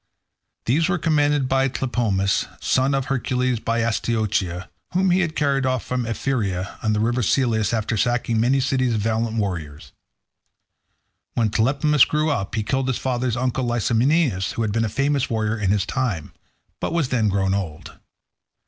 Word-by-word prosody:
These 160 +9 +2
were 195 - +1
commanded 150 -4 +2
by 135 0 +2
Tlepolemus, 115 -7 0
son 130 +2 +1
of 135 -1 -1
Hercules 125 -2 0
by 115 +1 -1
Astyochea, 110 -5 -1 0.3
whom 185 +1 +2
he 180 - +3
had 170 -4 -1
carried 140 -2 +1
off 130 -2 -1
from 125 -2 -2
Ephyra, 105 -6 -2
on 110 -1 +1
the 105 - 0
river 120 +3 +1
Selleis, 110 -2 +1
after 115 0 -1
sacking 120 0 0
many 130 +4 +3
cities 130 -2 +1
of 105 - -1
valiant 115 +1 -1
warriors. 85 -8 -4 1.4
When 110 -3 +1
Tlepolemus 140 +6 +3
grew 155 +1 0
up, 100 -6 -2
he 110 - 0
killed 135 +4 -1
his 130 - 0
father's 125 -2 -1
uncle 130 +1 -1
Licymnius, 120 - +1
who 115 - -2
had 110 - -1
been 115 +2 +1
a - - -2
famous 140 +3 0
warrior 110 -1 0
in 105 -4 -1
his 100 0 +1
time, 105 - -2 0.5
but - - -2
was 165 -6 0
then 115 -4 +1
grown 95 -1 +1
old. 90 -7 -5
120 Hz, 165 wpm, -22 LUFS, 110-135 Hz, 1.4 s, he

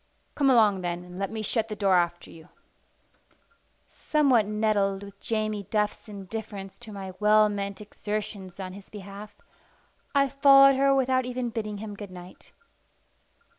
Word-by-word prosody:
"Come 280 -2 +2
along, 215 -6 +4
then, 175 0 -3
and 180 +1 -10
let 195 - -2
me 220 0 -5
shut 225 +1 -1
the 215 - -5
door 200 -2 +2
after 175 -1 0
you." 160 -1 -15 1.4
Somewhat 265 -8 +2
nettled 205 -2 0
with 200 0 -12
Jamie 215 -3 -2
Duff's 210 +1 -1
indifference 200 -1 -7
to 235 -2 -10
my 195 -2 -7
well 215 0 +5
meant 200 0 -4
exertions 205 -3 -6
on 185 -1 -6
his 200 0 -12
behalf, 200 0 -10 0.8
I 275 0 +4
followed 275 0 +6
her 275 +1 +3
without 260 -1 +2
even 250 -1 -3
bidding 215 -2 -4
him 210 0 -7
good 205 -1 -8
night. 180 0 -13
210 Hz, 150 wpm, -27 LUFS, 195-225 Hz, 1.4 s, followed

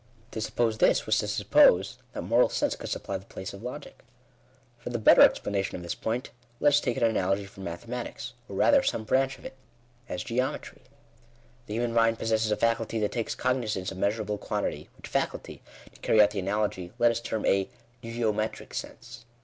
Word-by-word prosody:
To 110 - -4
suppose 110 0 0
this, - - +4
was - - +2
to - - -2
suppose 95 +8 +4
that - - -4
moral 115 +7 +4
sense - - 0
could - - -7
supply 100 - -3
the 95 - -17
place 95 - -7
of 100 - -10
logic. 125 +5 -8 0.8
Fqr_Jhe 120 -2 -4
better - - +8
explanation 100 -1 +3
of 90 - -6
this 85 - -3
point, 120 +4 -3 0.3
let 145 - +5
us 145 0 +4
take 125 - -2
an - - 0
^^alogjtirom 100 -2 0
mathematics, 115 +8 -6 0.2
or 100 - -7
rather 280 - +5
some 115 - -1
branch 135 +4 +1
of - - -17
it, - - -8 0.5
as 90 0 -3
geo 125 +3 0
metry. - - -10 0.9
The 105 - -4
human 120 0 -1
mind 115 0 +3
possesses 110 -1 0
a 105 - +1
faculty 115 -1 0
that 105 -2 0
takes 115 -2 -2
cog 130 0 +1
nizance 105 -7 -3
of 95 - -8
measurable 105 0 -1
quantity, - - -3
which - - -10
faculty, - - -3 0.3
to - - -19
carry 110 - +2
out 105 -1 +7
the 105 - -3
analogy, 95 -2 -2
let 120 -1 +4
us 115 - -2
term 110 -2 -3
a 95 -1 +2 0.3
geometric 115 -2 -2
sense. 120 +1 -8
110 Hz, 190 wpm, -28 LUFS, 100-120 Hz, 0.9 s, better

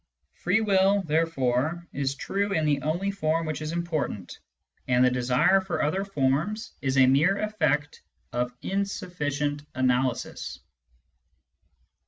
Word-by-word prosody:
Free 190 +5 +1
will, 195 -1 +3
therefore, 160 -1 0
is 140 0 -1
true 200 +7 -2
in 160 -4 +1
the 145 -2 +1
only 175 +6 -1
form 165 -4 0
which 155 -1 -3
is 155 0 -3
important; 160 - -3 0.5
and 125 0 +4
the 125 - +3
desire 125 +10 +3
for 190 -2 -2
other 185 +7 0
forms 170 - -1
is 135 0 0
a 130 - +7
mere 150 +10 +4
effect 150 -9 -1 0.3
of 125 0 -1
insufficient 150 -7 -2
analysis. 130 -1 -1
155 Hz, 125 wpm, -26 LUFS, 135-190 Hz, 0.5 s, a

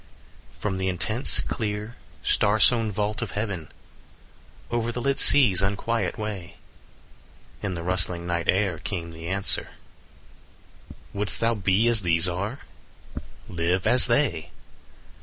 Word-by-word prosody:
From 95 -2 -3
the 95 - -2
intense, 110 +8 +2
clear, 105 +1 -5 0.3
star 105 +2 +1
sown 115 -1 +4
vault 105 +2 -3
of 115 - -5
heaven, 100 -7 -4 1.0
Over 120 0 -1
the 125 - -5
lit 140 +2 -1
sea's 115 -11 +6
unquiet 100 +4 -2
way, 100 -6 -7 1.1
In 95 -3 -4
the 85 - -6
rustling 90 -1 0
night 85 -1 -3
air 95 -4 +1
came 85 -3 -6
the 80 0 -9
answer: 95 +2 -1 1.2
15 - - -14 0.2
"Wouldst 105 -1 0
thou 115 0 +1
be 100 +1 +1
as 115 -3 +6
these 85 -1 +2
are? 100 +9 -4 0.9
Live 90 +2 -2
as 125 - +6
they. 120 - 0
100 Hz, 130 wpm, -24 LUFS, 90-115 Hz, 1.2 s, sea's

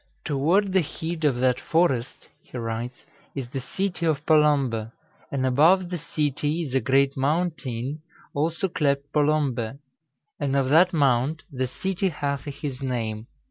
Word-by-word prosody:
"Toward 175 +8 +2
the 190 - +5
heed 160 +1 -5
of 140 -4 +3
that 130 -1 +3
forest 135 -8 0
(he - - -10
writes) 115 +1 -4 0.3
is 130 -4 -4
the 135 - -3
cytee 175 +4 -2
of 150 -1 0
Polombe, 140 -8 +3 0.4
and 130 -2 0
above 165 +8 +4
the 175 - -2
cytee 150 +2 -1
is 135 -5 -6
a 135 - +4
great 135 +3 +2
mountayne, 140 -3 -1 0.3
also 160 +5 0
clept 140 -4 -1
Polombe. 145 -5 +1 0.6
And 140 -2 0
of 135 -1 +2
that 170 +5 +6
mount, 140 -1 +2
the 130 -1 -1
Cytee 190 +8 -1
hathe 145 -2 -3
his 140 -1 -6
name. 115 -4 -3
140 Hz, 145 wpm, -25 LUFS, 130-160 Hz, 0.6 s, that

